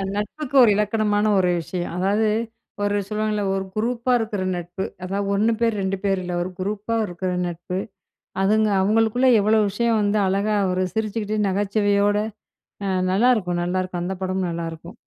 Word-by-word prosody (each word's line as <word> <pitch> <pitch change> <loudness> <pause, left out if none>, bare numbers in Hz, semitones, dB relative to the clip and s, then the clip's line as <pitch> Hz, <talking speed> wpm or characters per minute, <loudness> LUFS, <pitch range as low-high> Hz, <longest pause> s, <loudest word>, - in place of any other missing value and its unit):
நட்புக்கு 250 +7 -4
ஒரு 225 - +6
இலக்கணமான 210 0 +1
ஒரு 180 -1 +3
விஷயம். 175 +1 -4
அதாவது, 200 +4 +2 0.6
ஒரு 205 0 +1
சொல்லுவாங்கல்ல, 215 0 -1
ஒரு 195 0 -2
குரூப்பா 235 +3 0
இருக்குற 215 -4 -2
நட்பு. 175 +2 -5 0.2
அதாவ 200 +2 -2
1 220 +3 +2
பேர் 230 -2 +2
2 190 0 -1
பேர் 195 -2 +1
இல்ல, 180 0 -4
ஒரு 185 - -5
குரூப்பா 210 +4 -2
இருக்குற 180 +1 -3 0.2
நட்பு 175 +2 -4 0.6
அதுங்க 215 +2 +3
அவங்களுக்குள்ள 225 +5 +2
எவ்வளோ 215 +2 +3
விஷயம் 230 +3 +1
வந்து 205 +1 +1
அழகா 200 +3 +1 0.2
ஒரு 185 +1 0
சிரிச்சுக்கிட்டு 215 0 -2
நகச்சுவையோட, 205 +1 +1 0.7
அ - - -1 0.2
நல்லாருக்கும் 195 -5 +2
நல்லாருக்கும் 185 0 -2
அந்த 185 +2 -2
படமும் 185 0 -1
நல்லாருக்கும். 165 0 -6
205 Hz, 145 wpm, -22 LUFS, 185-215 Hz, 0.7 s, ஒரு